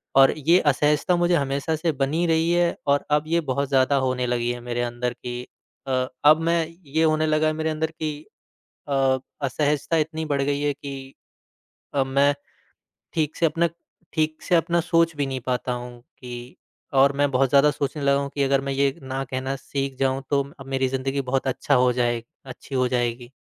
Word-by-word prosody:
और 135 0 +7
ये 165 +5 +4
असहजता 150 +4 +2
मुझे 175 0 +2
हमेशा 140 +1 0
से 160 +1 0
बनी 145 +4 0
रही 165 +1 +2
है 175 0 +2
और 140 0 +2
अब 150 - -3
ये 170 +1 +2
बहुत 140 +2 0
ज़्यादा 135 0 +3
होने 130 -1 0
लगी 120 0 0
है 120 - -5
मेरे 120 0 -3
अंदर 120 0 -2
की 120 0 -6 0.5
अ, 130 -1 0 0.2
अब 155 +1 +7
मैं 165 0 +2 0.2
ये 155 +3 0
होने 155 0 +3
लगा 155 0 +2
है 155 - +1
मेरे 160 +1 -2
अंदर 160 0 -2
की 155 -1 -3 0.8
अ, 135 -2 +2 0.2
असहजता 145 +3 0
इतनी 160 0 -1
बढ़ 145 -2 0
गई 140 +1 0
है 145 0 +1
कि 135 -1 -8 0.8
अब 135 -2 +2
मैं 140 +2 +3 0.8
ठीक 155 -2 -1
से 170 - +1
अपना 165 +2 +2 0.5
ठीक 155 -1 -1
से 180 - +2
अपना 170 +1 +2
सोच 165 -1 +2
भी 145 -1 0
नहीं 135 -1 -3
पाता 125 0 -1
हूँ 120 0 -7
कि 120 0 -10 0.4
और 135 +1 +5
मैं 145 0 +3
बहुत 130 0 +2
ज़्यादा 140 +2 +5
सोचने 145 +1 -3
लगा 140 0 +3
हूँ 140 0 -3
कि 140 - 0
अगर 135 0 +2
मैं 135 0 -3
ये 135 0 +2
ना 135 0 -4
कहना 130 +1 -3
सीख 135 0 -4
जाऊँ 135 0 0
तो 140 -1 +2 0.2
अ, - - -8
मेरी 135 0 -1
ज़िंदगी 135 +1 -2
बहुत 135 +1 -1
अच्छा 130 0 +1
हो 125 0 +4
जाए 120 -1 0 0.2
अच्छी 130 +1 -8
हो 130 -1 +2
जाएगी। 120 -1 -2
140 Hz, 195 wpm, -24 LUFS, 130-155 Hz, 0.8 s, और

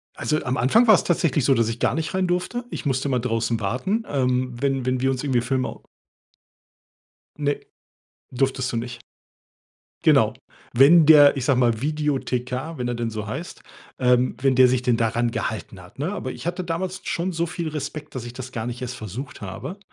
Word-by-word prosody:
Also, 155 0 -1
am 130 0 -1
Anfang 225 - +4
war 220 - +7
es - - +4
tatsächlich 155 -5 +1
so, 135 +2 +4
dass 115 -2 +2
ich 115 +1 -4
gar - - +1
nicht 160 +3 -3
rein 185 -1 +1
durfte. 180 +8 -2
Ich - - -6
musste 135 0 0
immer 130 -2 +1
draußen 115 -1 -1
warten, 130 - -1
ähm, 125 -2 0
wenn 135 -2 0
wenn 130 0 0
wir 130 - +2
uns 130 0 -2
irgendwie 130 -4 +1
Filme 130 +1 -1
au - - -11 1.6
Ne, 145 -1 0 0.7
durftest 130 0 -1
du - - -2
nicht. 120 +1 -5 1.0
Genau. - - +4 0.4
Wenn 150 +6 +7
der, 145 -2 +8
ich 130 - -3
sage 130 -3 +3
mal, 120 -3 +2
Videothekar, 145 -1 -2
wenn 125 - -2
er 120 - -1
denn 115 -1 -2
so 110 -1 -5
heißt, 150 +11 -6 0.4
ähm, 125 0 +2
wenn 135 -2 +3
der 130 0 +7
sich 125 0 +1
denn 125 -2 +2
daran 115 +1 0
gehalten 105 -4 -4
hat, 95 +9 -17
ne? 165 +7 -1
Aber 130 -10 -4
ich 120 +3 -9
hatte 180 +1 -2
damals 180 +2 -3
schon 175 +2 -1
so 165 +1 0
viel 170 -1 -4
Respekt, 150 0 -6
dass 130 - -4
ich 120 - -8
das 130 0 -8
gar 115 -3 -4
nicht 120 +1 -5
erst 125 0 -4
versucht 110 +5 -7
habe. 100 - -6
130 Hz, 200 wpm, -23 LUFS, 120-155 Hz, 1.6 s, der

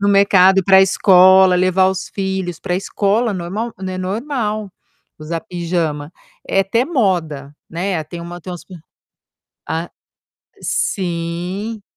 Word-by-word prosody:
No 200 - +1
mercado, 195 -1 +5
ir 190 - +1
para 190 -1 +6
escola, 190 -1 +5
levar 185 +1 +3
os 190 0 -3
filhos 190 -3 -3
pra 180 - -2
escola, 205 +4 0
normal 195 +6 -4
n 190 -1 -5
é 185 - -5
normal 215 +1 -3 0.5
usar 160 +2 -4
pijama, 165 -4 -3 0.4
é 195 - +2
até 230 +6 +1
moda, 175 - -1 0.2
né. 175 0 -2
Tem 170 +3 -8
uma 175 +1 -8
tem 180 - -9
umas 175 - -9
p 185 - -12 0.9
a 165 +2 -3 0.7
sim. 190 - -3
185 Hz, 135 wpm, -18 LUFS, 175-200 Hz, 0.9 s, para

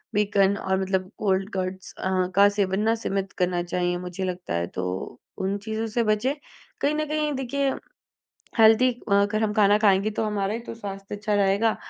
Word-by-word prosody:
Bacon 200 -1 +3
और 190 -1 -1
मतलब 190 0 -1
cold 195 -1 +1
cuts 185 0 -4
अ, 185 -1 0
का 200 +1 +7
सेवन 200 -1 0
ना 225 +1 +2
सीमित 195 -4 -3
करना 180 -1 +1
चाहिए 175 0 -1
मुझे 180 +1 -5
लगता 180 - -4
है, 85 0 -1
तो 90 +6 -5 0.2
उन 195 +1 -1
चीज़ों 220 +2 -3
से 230 +2 0
बचें। 215 +6 +1 0.5
कहीं 290 +2 +2
न 305 0 0
कहीं 305 0 0
देखिए, 270 +1 -1 0.9
हेल्दी 225 +3 +6 0.2
अगर 205 +2 +3
हम 210 - 0
खाना 205 -1 +5
खाएँगे 200 0 +3
तो 220 - -1
हमारा 205 -1 -1
ही 230 - -3
तो - - -6
स्वास्थ्य 195 -2 -7
अच्छा 210 +1 -2
रहेगा 200 +2 +2
200 Hz, 180 wpm, -25 LUFS, 190-220 Hz, 0.9 s, का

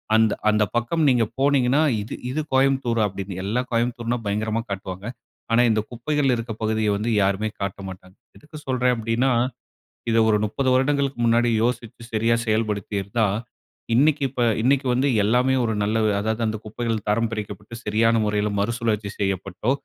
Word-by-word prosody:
அந்த 110 -1 +4 0.2
அந்த 105 0 +3
பக்கம் 120 +8 0
நீங்க 125 -3 +3 0.2
போனீங்கன்னா, 135 0 +3 0.2
இது 105 - -6 0.2
இது 150 - -2
கோயம்புத்தூரா 130 -4 +2
அப்டினு, 95 -1 -6
எல்லா 110 +5 0
கோயம்புத்தூர்னா 120 0 0
பயங்கரமா 110 +2 -1
காட்டுவாங்க. 95 0 -5 0.5
ஆனா, 115 +1 +5
இந்த 110 - +2
குப்பைகள் 135 +2 0
இருக்க 115 -1 -5
பகுதிய 110 -1 +1
வந்து 105 +3 -2
யாருமே 100 +2 +1
காட்ட 100 0 -3
மாட்டாங்க. 95 0 -11 0.2
எதுக்கு 150 +1 -12
சொல்றேன் 125 -1 +2
அப்டினா, 115 +3 0 0.8
இத 115 - +2
ஒரு 105 - +4
30 130 +5 -1
வருடங்களுக்கு 135 0 +1
முன்னாடி 120 +1 +3
யோசிச்சு 120 -1 -3
சரியா 115 +2 +2
செயல்படுத்திருந்தா, 105 -1 -1 0.7
இன்னிக்கு 145 +5 +3
இப்ப 125 -1 -4 0.2
இன்னிக்கு 135 +3 +2
வந்து 130 +3 +2 0.2
எல்லாமே 125 +5 +2
ஒரு 110 - 0
நல்ல 110 +2 0 0.2
அதாவது 110 +2 -2
அந்த 110 0 -2
குப்பைகள் 110 0 -3
தரம் 115 +2 +1
பிரிக்கப்பட்டு, 105 0 -6
சரியான 115 +2 +3
முறையில 105 0 0
மறுசுழற்சி 110 -1 -1
செய்யப்பட்டோ, 95 +3 -1
115 Hz, 150 wpm, -23 LUFS, 105-125 Hz, 0.8 s, ஆனா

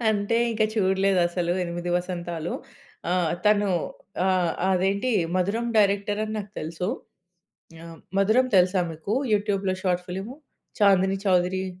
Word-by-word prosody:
అంటే 210 +2 0
ఇంకా 215 -1 +1
చూడలేదసలు 185 -3 +1
'8 175 +1 -4
వసంతాలు'. 175 -2 -4 0.6
ఆహ్, 175 -3 +1
తను 205 -1 +4 0.6
ఆహ్, 180 -3 +2 0.2
అదేంటి 195 +6 +1 0.3
'మధురం' 220 +6 0
డైరెక్టరని 205 +1 +1
నాకు 205 -1 -7
తెలుసు 165 +3 -4 1.0
ఆహ్, 165 -1 -10 0.2
'మధురం' 225 +6 +3
తెలుసా 180 +1 +3
మీకు 165 +8 -3 0.2
యూట్యూబ్‌లో 200 -2 0
షార్ట్ 180 -1 0
ఫిల్ము? 195 +9 -6 0.4
'చాందిని 195 -1 +4
చౌదరి'. 185 0 +2
190 Hz, 110 wpm, -25 LUFS, 180-205 Hz, 1.0 s, తను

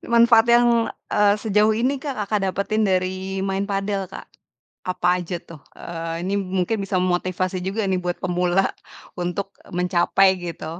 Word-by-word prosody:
manfaat 235 -1 +6
yang, 240 0 +5 0.4
eee, 205 -1 +4
sejauh 215 0 +3
ini 250 +5 +1
Kak, 280 -3 -3
Kakak 205 +1 0
dapetin 200 +3 0
dari 190 +1 -1
main 195 +1 -1
padel 195 -1 -2
Kak, 190 - -9 0.6
apa 180 -1 -1
aja 175 0 -4
tuh? 165 -3 -12 0.2
Eee, 165 0 -5
ini 190 +2 -2
mungkin 190 +2 -1
bisa 195 0 -3
memotivasi 185 +1 -1
juga 205 +4 -1
nih 190 -1 +1
buat 175 0 -2
pemula 180 +1 +1 0.5
untuk 180 +3 -3 0.2
mencapai 180 +2 +3
gitu 170 -3 -6
190 Hz, 150 wpm, -22 LUFS, 180-205 Hz, 0.6 s, manfaat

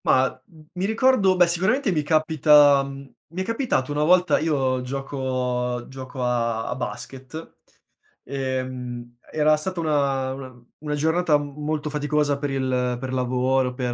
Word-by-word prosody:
Mah, 130 0 +2
mhmm, 155 -2 -18
mi 180 +1 -2
ricordo 220 -3 +3
beh, 180 -1 +6
sicuramente 190 +9 +1
mi 155 -4 +1
capita 150 -2 +5
mhmm, 140 0 -8 0.3
mi 185 - -3
è - - -8
capitato 230 - -1
una 145 +1 0
volta, 180 +3 +4
io 135 -5 0
gioco 125 -2 -3
gioco 130 -1 -7
a 115 -2 0
a 125 - -2
basket. 135 +4 -7 0.7
Ehm, 130 -2 -5
era 155 0 +3
stata 185 +3 -4
una 140 -4 0
una 130 -2 -10
una 150 -1 -3
giornata 160 +1 +2
m 145 -1 -6
molto 150 0 -2
faticosa 145 -1 0
per 145 0 -2
il 130 -2 -1
per 130 0 -5
lavoro, 130 0 +1
per 125 -1 -2
140 Hz, 150 wpm, -23 LUFS, 130-155 Hz, 0.7 s, beh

